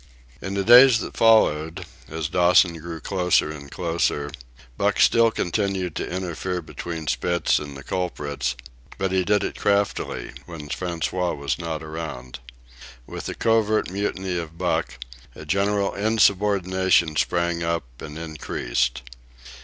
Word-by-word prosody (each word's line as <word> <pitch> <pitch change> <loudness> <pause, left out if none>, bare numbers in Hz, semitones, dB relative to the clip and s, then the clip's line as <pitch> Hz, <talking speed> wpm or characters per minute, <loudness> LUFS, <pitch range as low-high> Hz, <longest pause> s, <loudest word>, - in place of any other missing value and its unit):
In 95 +1 -4
the 100 - 0
days 125 +2 +8
that - - -7
followed, 80 -8 +3 0.2
as 80 -1 -3
Dawson 85 0 +4
grew 85 0 -7
closer 90 -5 +1
and 70 -2 -9
closer, 80 -3 -1 0.4
Buck - - 0
still 115 0 +5
continued 95 -4 -2
to - - -3
interfere 90 0 -3
between 80 0 -6
Spitz 85 +3 +1
and 70 -2 -8
the 70 - -10
culprits; 70 -7 -3 0.4
but 95 -1 -1
he 95 -1 +2
did 105 +2 +2
it - - -4
craftily, 100 -7 0 0.2
when 80 -4 -9
François 90 +1 -2
was 70 +2 -2
not 80 -2 -4
around, 75 -6 -7 0.7
With - - -7
the - - -4
covert 110 -4 +1
mutiny 95 -2 -2
of 85 0 -8
Buck, - - -1 0.4
a 75 - -10
general 100 +4 +1
insubordination 95 -5 +2
sprang 85 +1 0
up 85 -1 -1 0.2
and 75 +1 -8
increased. 65 -5 -2
85 Hz, 135 wpm, -23 LUFS, 80-95 Hz, 0.7 s, days